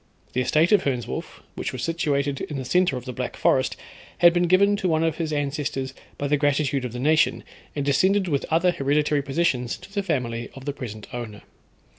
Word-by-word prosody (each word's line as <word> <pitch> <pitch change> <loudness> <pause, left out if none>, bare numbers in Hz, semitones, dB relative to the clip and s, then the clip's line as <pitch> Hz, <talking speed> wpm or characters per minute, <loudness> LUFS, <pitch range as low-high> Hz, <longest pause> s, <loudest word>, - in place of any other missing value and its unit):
The 125 - +1
estate 155 - +3
of 205 -3 +6
Hernswolf, 125 - -3
which - - -4
was - - -5
situated 145 -4 0
in 150 - -4
the 130 - -4
centre 180 -2 +2
of 125 - -8
the 125 - -5
Black - - -4
Forest, - - +2 0.4
had 170 -1 +6
been 175 0 +2
given 200 +3 +4
to 190 - -1
one 160 0 +2
of 165 -1 0
his 160 -2 -2
ancestors 140 -2 -2 0.2
by 145 - -3
the 150 +1 +2
gratitude 145 -2 +1
of 125 - -4
the - - -5
nation, 155 +4 +2 0.3
and 145 -2 -2
descended 190 +8 +3
with 145 -5 0
other 165 +3 +3
hereditary 145 0 +1
possessions 135 -4 0
to 195 - -15
the 200 - 0
family 120 -10 -2
of 135 -1 -10
the 145 - -2
present 110 -7 -7
owner. 115 -4 -6
145 Hz, 205 wpm, -24 LUFS, 130-165 Hz, 0.4 s, of